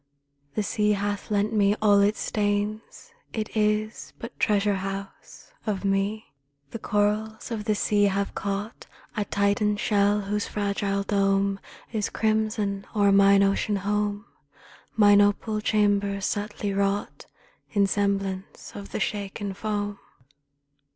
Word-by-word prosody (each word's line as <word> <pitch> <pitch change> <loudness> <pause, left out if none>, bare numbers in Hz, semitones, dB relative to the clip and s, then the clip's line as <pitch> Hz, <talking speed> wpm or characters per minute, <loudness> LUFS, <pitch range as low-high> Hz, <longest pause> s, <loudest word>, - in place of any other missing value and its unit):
The 215 - 0
sea 210 0 +1
hath 205 0 -3
lent 210 +1 +1
me 205 -1 +3
all 205 -2 +5
its 205 +1 +2
stains: 210 - -2 0.2
It 220 0 -4
is 215 0 0
but 230 - -9
treasure 205 -1 +2
house 195 - -7 0.2
of 200 -2 -2
me. 195 0 -1 0.4
The 230 - -5
corals 210 +2 -1
of 215 -2 -3
the 215 -2 +1
sea 205 0 +2
have 200 0 0
caught 200 +2 -4 0.3
A 210 -2 -1
Titan 205 +1 +1
shell 205 -1 +2
whose 205 +1 -2
fragile 200 -1 -1
dome 195 0 +1 0.3
Is 215 -3 -1
crimson 215 -2 -1
o'er 200 -1 +4
mine 200 0 +6
ocean 200 +1 +1
home, 205 +1 -1 0.7
Mine 205 -1 +6
opal 210 +1 +1
chambers 205 -2 +1
subtly 205 -1 -2
wrought 200 +1 -1 0.5
In 200 -2 +4
semblance 195 -1 -2
of 200 -1 -9
the - - -1
shaken 200 -1 -3
foam. 205 0 -3
205 Hz, 130 wpm, -26 LUFS, 200-210 Hz, 0.7 s, mine